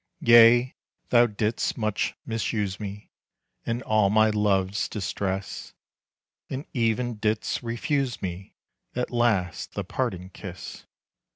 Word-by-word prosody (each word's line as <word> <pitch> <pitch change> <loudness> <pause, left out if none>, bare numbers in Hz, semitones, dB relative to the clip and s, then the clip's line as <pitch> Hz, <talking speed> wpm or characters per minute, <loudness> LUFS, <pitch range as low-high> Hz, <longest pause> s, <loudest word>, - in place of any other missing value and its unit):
Yea, 120 +2 +7 0.4
thou 120 0 +6
did'st 110 +1 -1
much 110 -3 -1
misuse 105 -3 -2
me, 105 -1 -7 0.6
In 120 +2 -1
all 110 -2 +3
my 110 +1 +4
love's 100 -1 +1
distress, 95 -1 -4 0.7
And 135 +3 -4
even 120 -1 0
didst 110 +1 -1
refuse 125 +2 -1
me 95 +1 -6 0.4
At 125 0 -2
last 110 -8 0
the - - -3
parting 95 +1 -3
kiss. 95 -1 -9
110 Hz, 110 wpm, -26 LUFS, 100-120 Hz, 0.7 s, Yea